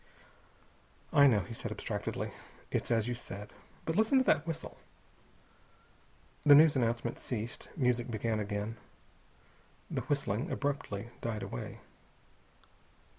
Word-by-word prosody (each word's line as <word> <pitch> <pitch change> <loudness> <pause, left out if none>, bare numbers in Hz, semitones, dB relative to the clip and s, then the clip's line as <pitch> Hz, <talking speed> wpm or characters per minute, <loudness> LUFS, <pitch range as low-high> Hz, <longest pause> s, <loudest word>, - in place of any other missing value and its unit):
"I 140 0 +8
know," 110 -6 +4
he 115 - -7
said - - -5
abstractedly. - - -3 0.4
"It's - - -1
as 115 -2 +2
you 125 - 0
said. 105 -3 -8 0.3
But 160 - -1
listen 220 +6 +4
to 260 - +5
that 160 - +3
whistle." 165 0 -5 1.6
The 145 -1 +9
news 150 0 +7
announcement 120 -1 0
ceased. 115 -1 -4
Music 125 -3 +2
began 110 -1 -1
again. 105 +2 -3 1.1
The - - -1
whistling 140 - -1
abruptly 120 -7 -2
died 110 -3 -2
away. - - -6
120 Hz, 120 wpm, -32 LUFS, 110-145 Hz, 1.6 s, The